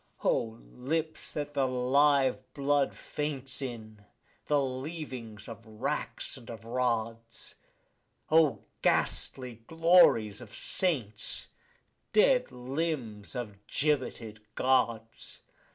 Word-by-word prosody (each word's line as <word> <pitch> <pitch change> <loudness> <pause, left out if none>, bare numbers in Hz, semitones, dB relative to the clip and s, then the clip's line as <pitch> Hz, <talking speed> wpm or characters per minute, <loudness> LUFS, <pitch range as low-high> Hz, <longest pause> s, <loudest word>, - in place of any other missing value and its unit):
O 115 -1 +1 0.2
lips 155 +5 -2
that 145 -1 -4
the 135 -2 +2
live 130 +2 +3
blood 140 -1 +2
faints 140 -3 -3
in, 110 -5 -7 0.4
the 145 -1 +4
leavings 130 - -5
of 115 -1 -9
racks 110 -1 -3
and 120 - -13
rods! 115 -1 -2 0.8
O 160 -2 +4 0.2
ghastly 125 -3 0
glories 165 - +5
of 115 -2 -10
saints, 120 - -1 0.6
dead - - +5
limbs 125 -5 -3
of 115 -5 -4
gibbeted 130 -7 -1 0.2
Gods! 115 -4 0
130 Hz, 90 wpm, -30 LUFS, 115-145 Hz, 0.8 s, glories